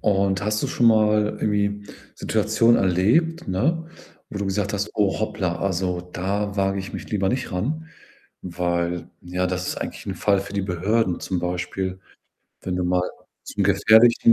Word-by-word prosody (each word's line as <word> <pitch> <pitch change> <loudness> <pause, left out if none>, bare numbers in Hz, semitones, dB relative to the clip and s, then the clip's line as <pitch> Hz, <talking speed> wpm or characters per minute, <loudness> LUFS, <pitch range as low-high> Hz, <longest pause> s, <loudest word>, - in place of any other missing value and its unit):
und 100 -1 +1
hast 105 0 0
du - - +1
schon 120 - +1
mal 105 -1 +3
irgendwie 105 -1 0 0.3
Situationen 115 +1 +3
erlebt, 110 - +2
ne, 160 - 0 0.4
wo 100 - -6
du 100 - -2
gesagt 100 +1 -1
hast: 100 0 -2
„Oh, 105 -2 +1
hoppla, 100 -5 -1
also 90 -2 -1
da 100 +3 -3
wage 95 0 +1
ich 95 - -8
mich - - -7
lieber 100 -3 +1
nicht 125 -2 -2
ran, 150 - -2 0.5
weil, 85 -1 -2
ja, 90 +1 -2
das 90 0 -2
ist - - -2
eigentlich - - -5
'n - - -4
Fall 100 -2 +2
für 100 +1 -8
die 100 -1 -1
Behörden.“ 95 +1 0
Zum 95 - -2
Beispiel, 90 +1 -3 0.6
wenn 90 -1 -2
du 90 - -1
mal 90 0 +2 0.4
zu 100 - -3
gefährlichen 110 +4 +6
100 Hz, 170 wpm, -23 LUFS, 90-105 Hz, 0.6 s, gefährlichen